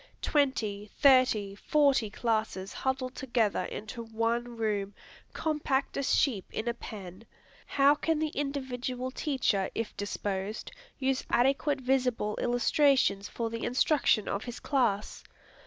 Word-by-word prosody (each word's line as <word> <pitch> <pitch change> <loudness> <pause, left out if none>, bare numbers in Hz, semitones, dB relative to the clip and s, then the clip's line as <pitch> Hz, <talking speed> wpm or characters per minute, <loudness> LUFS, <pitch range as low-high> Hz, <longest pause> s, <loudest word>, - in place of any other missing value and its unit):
Twenty, 220 -8 0
thirty, 255 -8 +4
forty 275 0 +2
classes 215 -4 -2
huddled 265 -1 -2
together 235 -6 0
into 220 +3 -6
one 230 +1 -2
room, 205 -3 -1 0.4
compact 300 -4 -1
as 275 -1 +1
sheep 220 -10 +1
in 220 - -4
a 235 - +1
pen, 200 -4 -9 0.4
how 280 +1 +5
can 320 +2 0
the 310 0 0
individual 260 -3 -3
teacher, 250 -9 0
if 225 -2 -3
disposed, 205 0 -4 0.3
use 265 -1 0
adequate 270 +3 +2
visible 250 -5 +1
illustrations 245 -4 +2
for 230 -1 -3
the 230 0 -4
instruction 250 -4 +2
of 200 - -2
his 240 -1 -6
class? 230 -7 0
240 Hz, 125 wpm, -30 LUFS, 215-270 Hz, 0.4 s, how